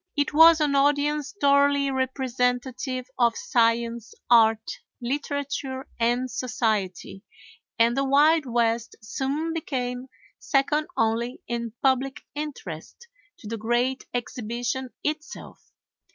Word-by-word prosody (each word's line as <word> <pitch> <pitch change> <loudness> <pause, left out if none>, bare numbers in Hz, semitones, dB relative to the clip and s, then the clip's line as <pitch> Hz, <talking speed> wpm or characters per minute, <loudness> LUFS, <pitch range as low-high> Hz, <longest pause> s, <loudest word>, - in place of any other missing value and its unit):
It 290 +1 0
was 325 +1 +8
an 295 -2 +1
audience 290 +1 +2
thoroughly 280 0 +3
representative 255 0 -1
of 235 -2 +3
science, 230 -1 0 0.2
art, 225 -2 +4 0.2
literature, 275 0 -3
and 240 +2 +1
society, 210 -6 -2 0.6
and 230 +1 +3
the 275 - +1
Wild 290 +2 +4
West 235 -1 0
soon 280 +8 -2
became 255 -5 -3 0.3
second 295 +2 +1
only 230 +2 0
in 235 -1 -3
public 270 +1 +1
interest 290 - -7 0.3
to 235 - -12
the 230 +2 -4
great 240 +4 -1
Exhibition 245 +1 -3
itself. 305 +1 -6
255 Hz, 105 wpm, -25 LUFS, 235-285 Hz, 0.6 s, was